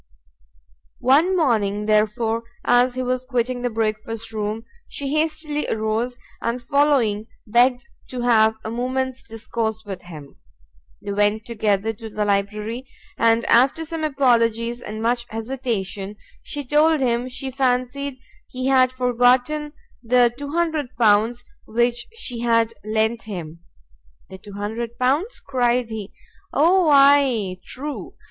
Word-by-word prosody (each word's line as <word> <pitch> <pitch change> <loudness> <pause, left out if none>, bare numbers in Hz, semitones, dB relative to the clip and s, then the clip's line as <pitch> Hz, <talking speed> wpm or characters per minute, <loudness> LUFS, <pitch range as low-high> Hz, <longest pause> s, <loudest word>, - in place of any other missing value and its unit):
One 315 +9 +3
morning, 210 - +1
therefore, 220 +2 +1 0.2
as 245 +1 +4
he 255 - -2
was 255 0 -1
quitting 250 -1 -1
the 245 - 0
breakfast 225 0 -3
room, 215 +1 -3 0.2
she 280 -1 -5
hastily 305 -1 -1
arose, 220 +3 -1 0.2
and 235 +2 -1
following, 245 -5 +2 0.2
begged 245 +3 +3 0.2
to 250 -1 -4
have 220 -2 +4
a 220 - -3
moment's 260 +2 -2
discourse 220 0 -4
with 195 -3 -6
him. 155 -5 -12 0.7
They 200 - -4
went 205 +2 +1
together 215 -2 0
to 225 +1 -9
the 210 0 -2
library, 210 +5 -1 0.3
and 230 0 +3
after 265 +7 +4
some 325 0 -4
apologies, 240 -4 +1
and 215 -1 -6
much 240 +1 0
hesitation, 220 -4 -4 0.3
she 290 -1 -4
told 300 +3 +3
him 245 -1 0
she 265 +1 -6
fancied 260 +1 -1 0.3
he 255 0 -5
had 260 -1 +4
forgotten 255 +4 +2 0.3
the 240 0 +3
L200 255 -7 +1 0.2
which 240 +1 0
she 250 - -5
had 230 -1 +2
lent 220 +2 0
him. 170 -6 -7 0.7
"The 190 - -9
L200," 235 - -2
cried 245 -3 +1
he; 215 -2 -6 0.4
"O, 340 +3 +4
ay, 275 -9 +4
true! 285 +7 -6
240 Hz, 125 wpm, -22 LUFS, 220-260 Hz, 0.7 s, as